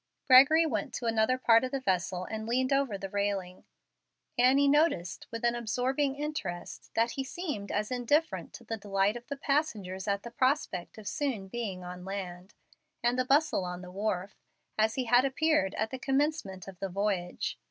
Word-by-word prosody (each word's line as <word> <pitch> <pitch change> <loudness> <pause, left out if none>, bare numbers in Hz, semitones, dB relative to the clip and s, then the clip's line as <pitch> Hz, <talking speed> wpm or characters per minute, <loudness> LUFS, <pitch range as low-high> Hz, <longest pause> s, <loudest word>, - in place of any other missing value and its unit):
Gregory 285 +5 +8
went 220 -10 -2
to 240 - -4
another 225 +2 +2
part 230 -2 +5
of 255 - -1
the 275 - -2
vessel, 185 -5 -1
and 220 +1 -5
leaned 255 +3 +1
over 275 -7 +1
the 195 - -5
railing. 200 -3 -2 0.7
Annie 265 +3 +5
noticed 280 - +2
with 230 0 -4
an 235 - +3
absorbing 255 +4 0
interest 280 - -5
that 230 +1 +2
he 270 - -3
seemed 275 - -5
as 210 +3 -1
indifferent 290 +6 0
to - - -10
the 225 - -4
delight 200 0 +1
of 240 0 -9
the 280 - -4
passengers 220 -11 -1
at 200 0 0
the 235 - -8
prospect 255 - 0
of 215 -2 -9
soon 240 -7 -2
being 200 -5 -4
on 180 0 -8
land, 185 0 -6 0.5
and 240 +1 +2
the 255 - +2
bustle 285 -5 +3
on 180 0 -5
the 180 - -9
wharf, 195 0 -2 0.4
as 220 +1 +2
he 260 - 0
had 245 +1 +5
appeared 275 -7 +1
at 220 +1 -1
the 260 - -5
commencement 270 - -1
of 190 -2 -10
the 195 - -3
voyage. 190 -2 -2
225 Hz, 185 wpm, -30 LUFS, 195-270 Hz, 0.7 s, Gregory